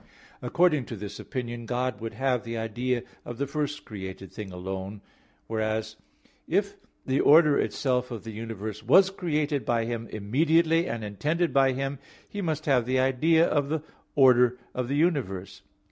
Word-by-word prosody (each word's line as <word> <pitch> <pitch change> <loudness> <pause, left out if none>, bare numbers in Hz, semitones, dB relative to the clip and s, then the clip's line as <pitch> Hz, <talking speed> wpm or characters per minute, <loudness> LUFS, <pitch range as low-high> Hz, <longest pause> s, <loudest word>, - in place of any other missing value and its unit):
According 160 -7 +2
to 115 - -6
this 100 0 -7
opinion 120 -2 -5
God 125 -3 -2
would 115 0 -5
have 130 -3 0
the 115 -1 -5
idea 120 +2 -1 0.2
of 120 - -7
the 140 - -1
first 145 +1 -3
created 95 -2 -8
thing 105 -3 -7
alone; 95 +2 -6 0.4
whereas, 110 0 -2 0.5
if - - 0 0.3
the 130 +1 +1
order 150 -1 +6
itself 125 -2 0
of 115 -4 -6
the 115 - -7
universe 110 -1 -6
was 190 - +5
created 150 -6 -1
by 115 -1 +1
Him 115 -1 -4
immediately, 160 - +2
and 115 -1 -4
intended 150 - -1
by 135 -1 +4
Him, 135 +1 -3 0.3
He 205 - -5
must 155 -4 -2
have 125 -5 +2
the 130 +1 +2
idea 155 +6 +4
of 145 -4 0
the 155 -1 -1 0.3
order 125 -3 +5 0.2
of 125 -1 -2
the 140 - -1
universe. 100 - -1
125 Hz, 160 wpm, -27 LUFS, 110-145 Hz, 0.5 s, order